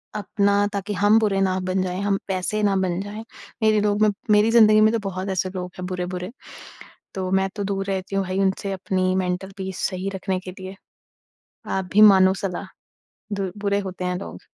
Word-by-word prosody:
अपना 200 Hz, 0 st, +1 dB
ताकि 200 Hz, +1 st, -3 dB
हम 205 Hz, +3 st, +4 dB
बुरे 205 Hz, -3 st, +1 dB
ना 185 Hz, -1 st, +1 dB
बन 185 Hz, +1 st, -1 dB
जाएँ, 185 Hz, +1 st, -3 dB
हम 200 Hz, -1 st, 0 dB
वैसे 190 Hz, +3 st, -1 dB
ना 200 Hz, -1 st, +3 dB
बन 185 Hz, -2 st, 0 dB
जाएँ। 205 Hz, +2 st, -7 dB, 0.4 s
मेरे 215 Hz, -1 st, +4 dB
लोग 205 Hz, 0 st, +1 dB
मे 215 Hz, -, +5 dB, 0.2 s
मेरी 210 Hz, +2 st, +5 dB
ज़िंदगी 215 Hz, -2 st, +6 dB
में 215 Hz, -, +5 dB
तो 230 Hz, -, +1 dB
बहुत 185 Hz, +1 st, -5 dB
ऐसे 185 Hz, 0 st, -1 dB
लोग 180 Hz, -1 st, -4 dB
हैं 180 Hz, -, -5 dB
बुरे-बुरे, 180 Hz, +1 st, -4 dB, 0.8 s
तो 185 Hz, -1 st, -3 dB
मैं 190 Hz, 0 st, +2 dB
तो 205 Hz, -, -3 dB
दूर 195 Hz, 0 st, -2 dB
रहती 195 Hz, 0 st, -3 dB
हूँ 195 Hz, -, +1 dB
भई 185 Hz, +1 st, -2 dB
उनसे 195 Hz, 0 st, 0 dB
अपनी 185 Hz, 0 st, 0 dB
मेंटल 185 Hz, +1 st, -2 dB
पीस 190 Hz, -1 st, -5 dB
सही 190 Hz, +1 st, -4 dB
रखने 190 Hz, -1 st, -2 dB
के 185 Hz, 0 st, -8 dB
लिए। 185 Hz, +1 st, -8 dB, 0.9 s
आप 190 Hz, -1 st, -1 dB
भी 210 Hz, -, +6 dB
मानो 190 Hz, -3 st, +7 dB
सलाह 190 Hz, -2 st, -4 dB, 0.7 s
दुर 195 Hz, -2 st, -2 dB
बुरे 200 Hz, 0 st, 0 dB
होते 185 Hz, -2 st, -5 dB
हैं 180 Hz, 0 st, -1 dB
लोग। -, -, -8 dB
195 Hz, 200 wpm, -23 LUFS, 185-205 Hz, 0.9 s, मानो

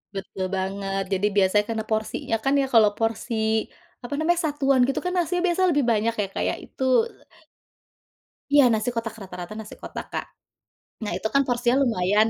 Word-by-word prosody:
Betul 195 Hz, -1 st, -4 dB
banget, 195 Hz, +1 st, -2 dB
jadi 195 Hz, +2 st, +2 dB
biasanya 200 Hz, +1 st, +3 dB
karena 220 Hz, -1 st, -2 dB
porsinya 220 Hz, +1 st, -1 dB
kan 270 Hz, -, +2 dB
ya, 270 Hz, -, +1 dB
kalau 225 Hz, -5 st, +5 dB
porsi, 225 Hz, +2 st, -1 dB, 0.7 s
apa 245 Hz, -, -6 dB
namanya, 340 Hz, +2 st, +2 dB
satuan 275 Hz, -3 st, +3 dB
gitu 270 Hz, +2 st, +1 dB
kan 360 Hz, 0 st, -3 dB
nasi 355 Hz, 0 st, +1 dB
biasa 365 Hz, 0 st, +2 dB
lebih 285 Hz, -4 st, +1 dB
banyak 225 Hz, 0 st, +2 dB
ya 205 Hz, -, +1 dB
Kak -, -, -1 dB
ya, -, -, -1 dB
itu -, -, -7 dB, 1.7 s
Iya 290 Hz, -, +8 dB
nasi 220 Hz, +2 st, 0 dB
kotak, 225 Hz, -1 st, -3 dB
rata 190 Hz, -, -9 dB
rata 175 Hz, +4 st, -7 dB
nasi 215 Hz, -1 st, -9 dB
kotak, -, -, -6 dB
Kak. -, -, -2 dB, 0.8 s
Nah 210 Hz, -, -3 dB
itu 205 Hz, -, -2 dB
kan 275 Hz, -, +5 dB
porsinya 245 Hz, 0 st, +2 dB
lumayan 215 Hz, -2 st, +2 dB
225 Hz, 175 wpm, -24 LUFS, 205-275 Hz, 1.7 s, Iya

